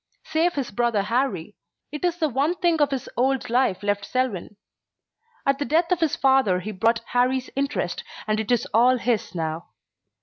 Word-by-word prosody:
Save 335 +2 +1
his 275 -6 -3
brother 230 -1 +1
Harrie, 210 -5 -1 0.4
it 300 +2 -6
is 350 -1 +1
the 320 -3 +1
one 285 +6 0
thing 340 -3 +1
of 290 - +4
his 270 -2 -3
old 255 0 0
life 240 -6 +1
left 205 0 0
Selwyn. 210 -5 -2 0.9
At 275 0 +2
the 290 - -1
death 335 +4 +1
of 360 - +2
his 320 -4 +1
father 265 -9 +3
he 215 - -5
bought 230 +3 +1
Harrie's 255 +1 +1
interest 280 +1 -2 0.2
and 215 0 0
it 220 +2 -2
is 245 - +2
all 245 +3 +5
his 230 -6 -1
now. 160 0 -3
250 Hz, 180 wpm, -24 LUFS, 215-280 Hz, 0.9 s, all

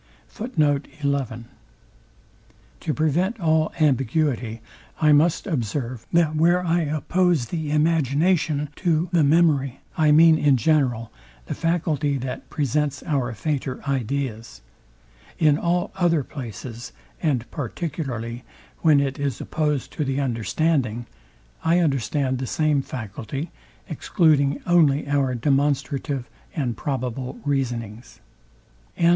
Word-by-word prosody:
To 150 - +1 2.1
prevent 175 +9 +1
all 160 -2 +2
ambiguity, 130 -5 +1 0.4
I 155 -1 +4
must 155 +3 +3
observe, 125 - -3
that 165 -2 +3
where 175 +3 +3
I 170 +1 +2
oppose 160 0 +1
the 160 -3 -3
imagination 150 0 +2
to 170 -1 +1
the 170 -3 +4
memory, 145 -4 +3 0.2
I 155 -1 +4
mean 160 +1 +6
in 140 -3 +4
general 120 -4 +1 0.3
the - - -4
faculty 155 -4 0
that 130 0 -6
presents 145 0 -1
our 135 -6 -1
fainter 135 +1 -3
ideas. 130 -3 -3 0.8
In 150 -2 +3
all 175 +1 0
other 175 -5 +2
places, 120 -2 -8 0.3
and 135 -8 0
particularly 130 -5 -4 0.4
when 155 -4 +5
it 135 -1 -2
is 140 -4 -2
opposed 150 -4 -2
to 150 - -2
the 135 0 -1
understanding, 125 -1 0 0.6
I 165 +2 +3
understand 135 -4 0
the 130 - -3
same 150 +1 +1
faculty, 125 - -6 0.4
excluding 145 -6 +2
only 155 -6 +3
our 140 -3 +1
demonstrative 140 0 0 0.3
and 130 -7 -1
probable 130 - -4
reasonings. 120 -4 -3 0.8
SECT. 170 - +4
145 Hz, 110 wpm, -23 LUFS, 130-160 Hz, 2.1 s, mean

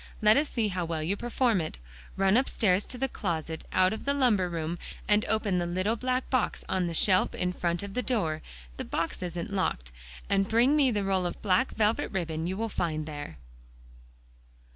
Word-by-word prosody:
Let 215 0 +6
us 290 +2 +2
see 225 -3 0
how 180 -2 -2
well 165 -2 -2
you 180 +6 0
perform 240 -2 +1
it. 155 - -5 0.4
Run 195 +1 +3
upstairs 210 -6 +2
to 255 - -8
the 270 +2 0
closet 165 -8 -3
out 185 +2 +3
of 220 - -6
the 280 0 0
lumber 215 -10 +3
room, 165 0 -3 0.3
and 210 0 +4
open 210 -4 +1
the 175 - -1
little 185 +6 0
black 255 +2 -1
box 255 -4 0
on 185 -2 0
the 170 - -3
shelf 185 +2 +3
in 180 0 0
front 170 +1 -1
of 200 -1 -6
the 250 - 0
door 195 -11 0 0.4
the - - -3
box 165 +2 -3
isn't 175 +2 -4
locked 60 - -1 0.4
and 195 0 +1
bring 240 +6 +4
me 285 -3 +4
the 210 -4 0
roll 190 -2 +1
of - - -6
black 210 +6 +2
velvet 215 +1 +1
ribbon 165 -4 -2
you 190 +1 -3
will 225 +1 -1
find 155 -7 -2
there." 145 - -7
195 Hz, 200 wpm, -28 LUFS, 170-225 Hz, 0.4 s, Let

